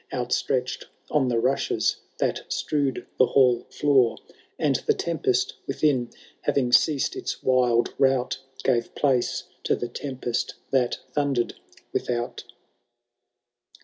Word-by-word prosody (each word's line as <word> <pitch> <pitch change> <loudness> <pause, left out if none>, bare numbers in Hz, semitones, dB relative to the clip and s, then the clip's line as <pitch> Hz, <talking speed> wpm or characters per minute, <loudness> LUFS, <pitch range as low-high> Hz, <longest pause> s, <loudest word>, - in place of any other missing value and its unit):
Outstretched 125 0 -1 0.3
on 140 -4 +3
the 120 -2 +1
rushes 130 +4 +1 0.2
that - - -2
strewed 140 -4 -1
the 130 - +6
hall 125 -3 +3
floor; 130 -6 +3 0.4
And 145 -5 +2
the - - +4
tempest 390 - 0
within, 130 -6 +1 0.3
having 125 -3 +1
ceased 145 +2 +3
its - - -4
wild 125 -2 +3
rout. 130 -1 +2 0.2
Gave 120 -3 +1
place 135 -4 +1 0.2
to - - +3
the 120 - -4
tempest 125 -2 -3 0.2
that 125 -3 +2 0.2
thundered 140 -5 0 0.4
without. 120 0 -2
130 Hz, 115 wpm, -25 LUFS, 120-140 Hz, 0.4 s, the